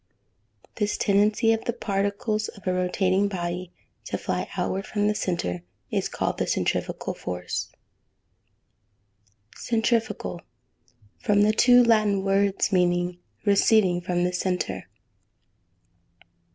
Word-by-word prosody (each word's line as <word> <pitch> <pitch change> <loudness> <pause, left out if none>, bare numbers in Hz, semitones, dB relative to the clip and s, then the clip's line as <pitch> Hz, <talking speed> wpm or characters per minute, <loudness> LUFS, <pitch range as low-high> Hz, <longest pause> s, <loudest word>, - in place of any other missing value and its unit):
This 210 -1 0
tendency 210 +3 +3
of 225 - -3
the 235 - 0
particles 205 0 -1
of 200 - -12
a 185 - +1
rotating 185 +2 +1
body 180 -2 -4 0.3
to - - -3
fly - - -3
outward 195 +1 -2
from 205 -1 0
the 210 - +2
centre, 170 - -2 0.3
is - - -1
called - - -2
the - - 0
centrifugal - - -1
force. 90 -1 -4 1.8
Centrifugal. 225 -6 -1 0.8
From 205 +1 +3
two 245 +2 +6
Latin 215 -4 +3
words 195 0 +1
meaning 175 -1 +1 0.3
receding 200 -3 +4
from 175 0 -1
the 180 0 0
centre. 180 - -2
195 Hz, 110 wpm, -25 LUFS, 180-215 Hz, 1.8 s, two